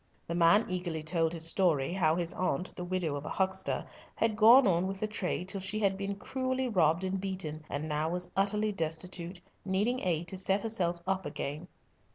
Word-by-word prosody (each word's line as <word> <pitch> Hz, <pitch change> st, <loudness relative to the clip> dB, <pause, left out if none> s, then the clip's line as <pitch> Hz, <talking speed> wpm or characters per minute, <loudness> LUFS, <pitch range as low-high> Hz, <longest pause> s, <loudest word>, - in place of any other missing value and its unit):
The 170 Hz, -, -4 dB
man 175 Hz, +6 st, +5 dB
eagerly 175 Hz, -4 st, -3 dB
told 165 Hz, 0 st, +1 dB
his 165 Hz, -1 st, 0 dB
story, 165 Hz, -4 st, +2 dB
how 160 Hz, -4 st, +2 dB
his 170 Hz, -1 st, -1 dB
aunt, 185 Hz, 0 st, -2 dB
the 180 Hz, -, -5 dB
widow 175 Hz, -4 st, -1 dB
of 140 Hz, -, -5 dB
a -, -, -5 dB
huckster, 190 Hz, 0 st, 0 dB, 0.3 s
had 225 Hz, -1 st, +1 dB
gone 230 Hz, +5 st, +8 dB
on 180 Hz, -1 st, +2 dB
with 195 Hz, 0 st, -4 dB
the 215 Hz, -, 0 dB
trade 185 Hz, -3 st, -3 dB
till 195 Hz, 0 st, -4 dB
she 200 Hz, +3 st, -2 dB
had 195 Hz, -2 st, +2 dB
been 200 Hz, +1 st, -3 dB
cruelly 260 Hz, +4 st, -2 dB
robbed 170 Hz, -5 st, +2 dB
and 190 Hz, 0 st, -2 dB
beaten, 185 Hz, -6 st, -4 dB
and 145 Hz, +2 st, -3 dB
now 155 Hz, +1 st, -1 dB
was 180 Hz, +1 st, -3 dB
utterly 210 Hz, +2 st, +1 dB
destitute, 175 Hz, 0 st, -3 dB, 0.2 s
needing 205 Hz, +7 st, 0 dB
aid 170 Hz, -4 st, -1 dB
to 190 Hz, -, -3 dB
set 195 Hz, +1 st, +2 dB
herself 175 Hz, -6 st, 0 dB
up 190 Hz, 0 st, 0 dB
again. 150 Hz, +5 st, -5 dB
185 Hz, 200 wpm, -31 LUFS, 165-195 Hz, 0.3 s, gone